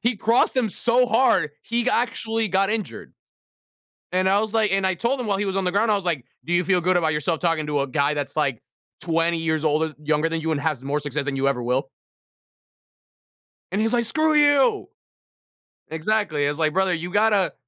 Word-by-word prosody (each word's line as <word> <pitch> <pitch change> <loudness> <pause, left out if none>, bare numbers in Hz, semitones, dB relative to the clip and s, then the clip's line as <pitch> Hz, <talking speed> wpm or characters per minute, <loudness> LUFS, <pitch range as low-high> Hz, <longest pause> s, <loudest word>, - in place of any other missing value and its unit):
He 240 +1 +1
crossed 230 +5 +1
him 240 -4 +1
so 240 +5 +2
hard, 190 - +2
he 235 +1 -1
g 255 - +1
actually 225 -2 -1
got 195 +2 +1
injured. 220 -2 -5 1.0
And 185 +1 +2
I 200 +1 +3
was, 220 0 -3
like 215 -3 +2
and 195 -1 +2
I 185 - +1
told 235 +8 -1
him 240 - -4
while 200 - +1
he 205 - -1
was 195 -1 -2
on 190 - -1
the 180 - 0
ground, 215 +2 +2
I - - +3
was, 195 -2 -4
like, 155 -8 -1 0.2
"Do 175 - -2
you 175 - +2
feel 180 +1 +2
good 180 +1 +1
about 160 -3 +2
yourself 150 +2 -1
talking 165 -3 0
to 145 -2 0
a 140 - -2
guy 140 +3 0
that's, 145 +1 -4
like, 140 -6 0 0.4
20 165 0 0
years 160 -1 -1
older 155 +1 0
younger 150 +2 0
than 165 0 -2
you 160 0 -2
and 145 - -3
has 155 -5 -2
more 140 +2 -2
success 145 0 -3
than 145 -1 -2
you 135 +1 +1
ever 125 -3 -2
will?” 125 +3 -1 1.8
And 200 - 0
he's, 225 +2 0
like, 235 -1 +1
"Screw 310 +6 +1
you!" 295 - +3 1.0
Exactly. 160 -3 -1
I - - +1
was, 145 - -5
like, 155 -1 +1
"Brother, 190 -1 +1
you 175 +2 -5
gotta 205 -1 +2
180 Hz, 220 wpm, -23 LUFS, 155-220 Hz, 1.8 s, I